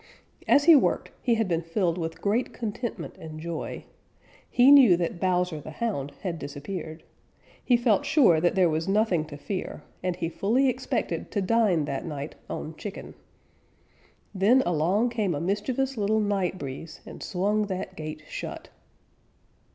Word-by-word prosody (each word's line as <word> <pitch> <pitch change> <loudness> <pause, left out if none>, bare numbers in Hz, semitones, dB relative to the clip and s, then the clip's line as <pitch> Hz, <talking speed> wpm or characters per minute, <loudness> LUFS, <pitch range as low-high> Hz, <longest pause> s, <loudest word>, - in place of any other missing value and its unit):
As 285 - +5
he 330 +1 +8
worked 275 - +2
he 240 -2 +2
had 225 -2 0
been 170 -2 0
filled 170 +1 0
with 165 -1 -5
great 220 +5 0
contentment 230 +1 -5
and 155 -1 -8
joy. 165 0 -5 0.7
He 255 +3 +6
knew 255 -11 +8
that 170 0 -2
Bowser 180 -4 0
the - - -9
Hound 170 - -3
had 175 -4 -3
disappeared. 155 +3 -6 0.6
He 245 - +4
felt 230 -4 +2
sure 175 - +4
that 175 - +2
there 185 -2 +4
was 160 +1 -1
nothing 195 -5 +2
to 150 -2 -9
fear, 185 +6 -5 0.2
and 180 -1 -1
he 170 -1 -2
fully 235 +10 +1
expected - - -2
to 210 - -1
dine 190 -7 +2
that 140 - -3
night 150 -3 -5 0.2
on 155 +1 -5
chicken. 205 -1 -7 1.2
Then 215 +7 +4
along 175 +8 +2
came 210 -8 0
a - - -2
mischievous 235 - -1
little 215 +1 +1
Night 195 -3 0
Breeze 140 +2 -7
and - - -10
swung 205 +3 0
that 185 -1 -5
gate 155 -1 -7
shut. - - -7
185 Hz, 160 wpm, -26 LUFS, 165-220 Hz, 1.2 s, he